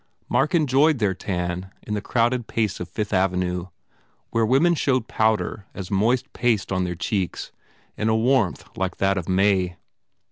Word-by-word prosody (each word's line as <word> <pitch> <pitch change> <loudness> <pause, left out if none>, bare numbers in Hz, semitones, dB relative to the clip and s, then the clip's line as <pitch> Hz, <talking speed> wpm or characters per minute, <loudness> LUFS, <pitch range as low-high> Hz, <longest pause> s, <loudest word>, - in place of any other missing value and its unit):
Mark - - +1
enjoyed 150 0 +4
their 105 -5 +1
tan 90 0 -3
in 105 - -5
the 105 - -1
crowded 120 +2 0
pace 110 -4 -1
of 90 - -6
Fifth 105 -1 -3
Avenue 90 -1 0 0.6
where 115 - +2
women 145 +9 +4
showed 130 -7 +1
powder 110 -2 0
as 95 -1 -6
moist 120 +7 +1
paste 115 -5 0
on 95 -1 +1
their 90 0 -3
cheeks 90 +2 -2 0.4
in 110 - 0
a 110 - +3
warmth 115 - +1
like 95 0 -2
that 95 0 +2
of 85 - -7
May. 95 -2 +2
105 Hz, 165 wpm, -23 LUFS, 95-120 Hz, 0.6 s, enjoyed